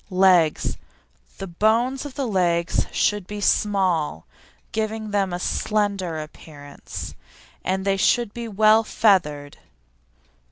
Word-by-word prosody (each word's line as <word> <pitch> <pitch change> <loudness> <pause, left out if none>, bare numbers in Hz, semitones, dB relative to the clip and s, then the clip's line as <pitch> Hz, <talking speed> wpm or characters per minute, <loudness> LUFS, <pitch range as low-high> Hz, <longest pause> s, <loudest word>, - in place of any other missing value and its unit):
LEGS 185 -4 +3 0.6
The - - -5
bones 230 +9 0
of 275 - -12
the 275 - -2
legs 175 -4 0
should 205 -3 0
be 210 0 -6
small, 185 - +1 0.5
giving 220 -1 -3
them 200 -2 0
a 175 - -2
slender 200 -4 -1
appearance, 150 -2 -9 0.5
and 190 +1 -1
they 195 -1 +1
should 230 +2 +2
be 235 -1 -6
well 215 +1 +4
feathered. 150 -11 +1
195 Hz, 115 wpm, -23 LUFS, 170-215 Hz, 0.6 s, well